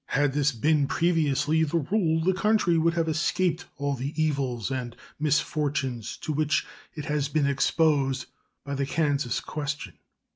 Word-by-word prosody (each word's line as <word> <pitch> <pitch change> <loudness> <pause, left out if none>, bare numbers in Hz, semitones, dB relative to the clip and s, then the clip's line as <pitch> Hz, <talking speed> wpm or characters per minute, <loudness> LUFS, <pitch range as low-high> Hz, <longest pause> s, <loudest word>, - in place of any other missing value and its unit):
Had 140 -1 +1
this 145 0 +2
been 145 +3 +2
previously 160 -2 +2
the 160 +2 0
rule, 160 0 +1
the 190 +3 +3
country 210 -3 +2
would 165 +1 +2
have 165 -1 +1
escaped 170 +2 0
all 140 0 -1
the 140 +4 -4
evils 135 -8 0
and 125 -3 -4 0.2
misfortunes 145 -5 -1
to 155 - -2
which 155 +1 +1 0.3
it 150 -2 -5
has 150 -1 -1
been 150 -1 +1
exposed 140 -1 +2 0.4
by 140 - -4
the 140 -1 -1
Kansas 145 -6 0
question. 145 - -5
150 Hz, 150 wpm, -26 LUFS, 140-160 Hz, 0.4 s, the